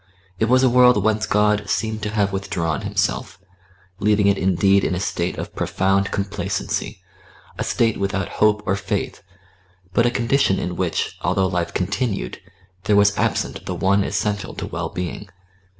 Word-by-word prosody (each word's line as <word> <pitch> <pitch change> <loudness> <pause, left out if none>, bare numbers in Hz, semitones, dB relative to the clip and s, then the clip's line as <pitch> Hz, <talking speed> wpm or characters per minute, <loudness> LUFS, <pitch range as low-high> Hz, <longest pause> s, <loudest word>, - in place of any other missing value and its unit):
It 110 - +1
was 130 +1 +4
a - - +6
world 125 -4 +5
whence 110 0 +1
God 105 0 +2
seemed 110 -1 -1
to 105 - -2
have 100 -2 0
withdrawn 85 -4 -2
Himself, - - -2 0.6
leaving 105 0 +2
it 100 0 +4
indeed 95 +1 +3
in 90 - 0
a - - -2
state 90 -2 -2
of - - -6
profound 95 +1 +1
complacency 100 0 -3 0.6
a - - 0
state 115 -2 +1
without 100 -1 -1
hope 105 0 +4
or 95 - +1
faith, 95 0 -3 0.7
but 115 +3 +3
a - - +3
condition 120 -3 +1
in 90 - -3
which, 90 -2 -2
although 95 - +1
life 85 -2 -2
continued, 100 - -2 0.4
there 105 - +3
was 100 0 +4
absent - - -1
the - - -2
one 100 +1 +2
essential 105 0 -2
to - - -4
well - - -4
being. 90 +3 -5
100 Hz, 165 wpm, -21 LUFS, 95-105 Hz, 0.7 s, a